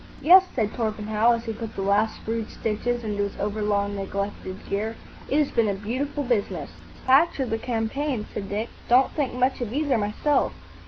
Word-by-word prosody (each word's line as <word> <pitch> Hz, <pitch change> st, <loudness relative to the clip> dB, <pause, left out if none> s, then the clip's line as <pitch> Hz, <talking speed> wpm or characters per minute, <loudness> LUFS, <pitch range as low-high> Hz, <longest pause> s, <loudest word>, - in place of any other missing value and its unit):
"Yes," 370 Hz, +3 st, +8 dB
said 215 Hz, -4 st, 0 dB
Torpenhow, 220 Hz, 0 st, +1 dB
as 230 Hz, 0 st, -3 dB
he 225 Hz, -, -3 dB
put 225 Hz, 0 st, -7 dB
the 195 Hz, -, -2 dB
last 205 Hz, +3 st, +1 dB
rude 225 Hz, 0 st, -2 dB
stitches 240 Hz, +2 st, -2 dB
into 205 Hz, -2 st, -2 dB
his 200 Hz, -1 st, -3 dB
over 210 Hz, +1 st, -2 dB
long 205 Hz, -1 st, 0 dB
neglected 200 Hz, -1 st, -4 dB
gear, 215 Hz, +3 st, -2 dB, 0.3 s
"it 280 Hz, -, +2 dB
has 300 Hz, -2 st, +2 dB
been 230 Hz, -2 st, +2 dB
a 200 Hz, -, 0 dB
beautiful 260 Hz, +8 st, -3 dB
business." 240 Hz, -6 st, -1 dB, 0.3 s
"The -, -, -18 dB
patch 275 Hz, +5 st, +4 dB
or 265 Hz, -, +1 dB
the 225 Hz, -2 st, -2 dB
campaign?" 240 Hz, +1 st, -2 dB
said 195 Hz, -1 st, -5 dB
Dick. 215 Hz, +4 st, -2 dB, 0.2 s
"Don't 255 Hz, +2 st, +5 dB
think 275 Hz, -5 st, -2 dB
much 255 Hz, +1 st, +1 dB
of 230 Hz, -3 st, -3 dB
either, 280 Hz, -2 st, +1 dB
myself." 210 Hz, +8 st, +1 dB
225 Hz, 195 wpm, -25 LUFS, 210-255 Hz, 0.3 s, Yes